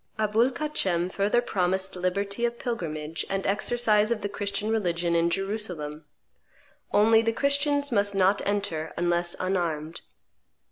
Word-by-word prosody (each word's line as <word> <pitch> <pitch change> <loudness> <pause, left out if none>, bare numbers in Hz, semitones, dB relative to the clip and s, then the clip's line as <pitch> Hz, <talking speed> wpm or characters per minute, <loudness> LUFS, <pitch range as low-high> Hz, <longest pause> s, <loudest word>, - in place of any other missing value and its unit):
Aboul 220 +3 +2
Kacem 190 - 0
further 205 +5 +1
promised 190 -2 -1
liberty 200 +4 -2
of 235 0 0
pilgrimage 165 - -4
and 195 0 -2
exercise 215 +1 +2
of 235 -3 -1
the 205 - -3
Christian 205 +1 -2
religion 175 -5 0
in 170 0 +3
Jerusalem; 175 -6 -3 0.9
only 220 +2 +5
the 225 0 +1
Christians 285 +2 +1
must 200 -2 +1
not 195 +1 +3
enter, 185 -6 -2
unless 175 0 +1
unarmed. 170 -4 -2
200 Hz, 130 wpm, -26 LUFS, 175-225 Hz, 0.9 s, only